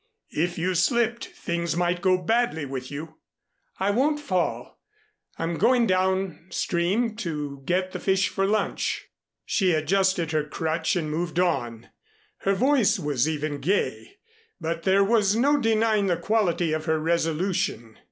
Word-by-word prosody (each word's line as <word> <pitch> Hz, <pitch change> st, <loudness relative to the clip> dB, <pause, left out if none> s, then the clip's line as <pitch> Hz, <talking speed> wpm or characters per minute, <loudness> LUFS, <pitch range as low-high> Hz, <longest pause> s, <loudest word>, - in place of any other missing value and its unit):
"If 175 Hz, +3 st, -1 dB
you 180 Hz, +2 st, 0 dB
slipped, 235 Hz, -, +1 dB
things 170 Hz, -, -3 dB
might 175 Hz, 0 st, 0 dB
go 185 Hz, -1 st, +3 dB
badly 205 Hz, -3 st, 0 dB
with 130 Hz, -1 st, -6 dB
you." 155 Hz, +3 st, -8 dB, 0.6 s
"I 195 Hz, +1 st, +2 dB
won't 290 Hz, +7 st, +1 dB
fall. 185 Hz, -12 st, -2 dB, 0.6 s
I'm 165 Hz, 0 st, -2 dB
going 240 Hz, +3 st, +4 dB
down 185 Hz, -2 st, 0 dB
stream 195 Hz, +7 st, 0 dB
to 150 Hz, -9 st, -4 dB
get 185 Hz, +2 st, 0 dB
the -, -, -5 dB
fish 190 Hz, 0 st, +2 dB
for 195 Hz, 0 st, -1 dB
lunch." 215 Hz, +2 st, -1 dB, 0.4 s
She 185 Hz, -3 st, +2 dB
adjusted 175 Hz, +1 st, +1 dB
her 155 Hz, -1 st, +1 dB
crutch 160 Hz, +3 st, -1 dB
and 155 Hz, -4 st, -2 dB
moved 170 Hz, +1 st, -2 dB
on. 120 Hz, -10 st, -1 dB, 0.5 s
Her 195 Hz, 0 st, +1 dB
voice 245 Hz, -1 st, +3 dB
was 145 Hz, -4 st, 0 dB
even 150 Hz, -1 st, -3 dB
gay, 200 Hz, -, -1 dB, 0.4 s
but 165 Hz, 0 st, -3 dB
there 190 Hz, +3 st, +4 dB
was 210 Hz, -1 st, +3 dB
no 280 Hz, +5 st, +3 dB
denying 220 Hz, -3 st, +2 dB
the 175 Hz, -2 st, +1 dB
quality 180 Hz, -7 st, +1 dB
of 155 Hz, 0 st, -2 dB
her 160 Hz, -1 st, +1 dB
resolution. 165 Hz, -, -1 dB
180 Hz, 145 wpm, -25 LUFS, 160-205 Hz, 0.6 s, going